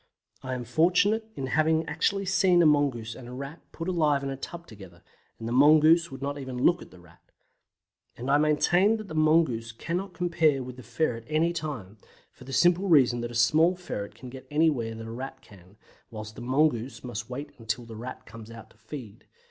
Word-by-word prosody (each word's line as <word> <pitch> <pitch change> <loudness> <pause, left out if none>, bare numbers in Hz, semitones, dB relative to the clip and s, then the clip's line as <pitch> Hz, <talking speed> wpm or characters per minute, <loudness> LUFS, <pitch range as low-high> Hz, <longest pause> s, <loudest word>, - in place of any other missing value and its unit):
I 130 -1 -4
am 125 - -4
fortunate 180 - +2
in 135 - -4
having 160 +4 +2
actually 195 +6 -1
seen 185 -2 +4
a - - +4
mongoose 140 -7 +2
and 120 +1 -11
a 125 - -9
Rat 140 +5 -7
put 165 - -6
alive 155 -6 +1
in 135 - -3
a - - -4
tub 170 +5 -8
together, 95 - -14 0.3
and 115 - -6
the - - -3
mongoose 155 +5 +5
would 135 -1 -8
not 145 +1 -3
even 130 -2 -6
look 175 +7 +3
at - - -11
the - - -16
Rat. 90 -2 -20 1.0
And 130 +3 -3
I 145 - +5
maintain 175 +8 +3
that 215 -3 -9
the - - -7
mongoose 155 -8 +2
cannot 175 +10 -4
compare 160 -6 +1
with 125 0 -9
the - - -9
ferret 120 -1 -2
anytime, 155 - -2 0.3
for 130 - -16
the 135 - -9
simple 175 +7 +3
reason 130 -8 +4
that 120 - -4
a 120 - -9
small 155 +10 +4
ferret 105 - -6
can 130 - -10
get 130 0 -11
anywhere 145 -7 +1
that 115 0 -8
a 115 - -7
Rat 130 +4 -7
can, 95 0 -18 0.3
whilst 110 -1 -8
the 120 - -10
mongoose 130 -2 0
must 120 -2 -6
wait 140 +4 -6
until 115 +1 -3
the 115 -1 -10
Rat 125 +4 -8
comes 115 -1 -11
out 115 -2 -12
to - - -24
feed. 125 -9 -10
135 Hz, 205 wpm, -27 LUFS, 115-160 Hz, 1.0 s, mongoose